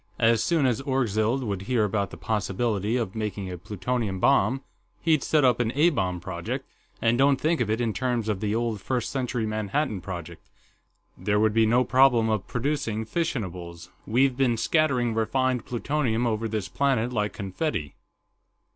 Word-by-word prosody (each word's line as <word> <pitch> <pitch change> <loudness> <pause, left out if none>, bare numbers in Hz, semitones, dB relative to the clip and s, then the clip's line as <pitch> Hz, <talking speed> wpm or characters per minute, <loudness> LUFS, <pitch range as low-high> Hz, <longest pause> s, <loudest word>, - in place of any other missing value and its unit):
"As 115 -1 +3
soon 165 -5 +2
as 125 0 +1
Orgzild 125 -2 0
would 100 -5 -3
hear 120 -4 +3
about 100 -1 0
the - - -10
possibility 105 +1 -1
of 110 -6 -2
making 105 -3 -4
a 90 - -5
plutonium 105 +2 -2
bomb, 135 +3 +3 0.4
he'd 160 -3 +2
set 150 -3 +2
up 125 -1 +3
an 115 -2 +1
A 160 +5 +5
bomb 90 - -1
project, - - -5 0.4
and 115 +2 +3
don't 135 0 +4
think 155 +3 +1
of 115 - 0
it 110 +2 0
in 115 -3 0
terms 125 -3 -1
of 105 -3 -1
the 105 +1 -1
old 115 -3 -1
First 125 0 -2
Century 125 -3 -2
Manhattan 110 +1 -1
Project. 85 -2 -7 0.7
There 105 0 0
would 110 0 +3
be 110 0 +4
no 120 +3 +4
problem 125 -4 +4
of 105 -3 -1
producing 120 -4 -2
fissionables 90 - -4 0.2
we've 130 +3 +3
been 125 -3 +2
scattering 125 -3 +2
refined 125 +2 0
plutonium 125 -2 0
over 115 -1 0
this 105 -3 -3
planet 125 -4 0
like 105 -2 -1
confetti." 95 - -3
115 Hz, 170 wpm, -26 LUFS, 105-130 Hz, 0.7 s, A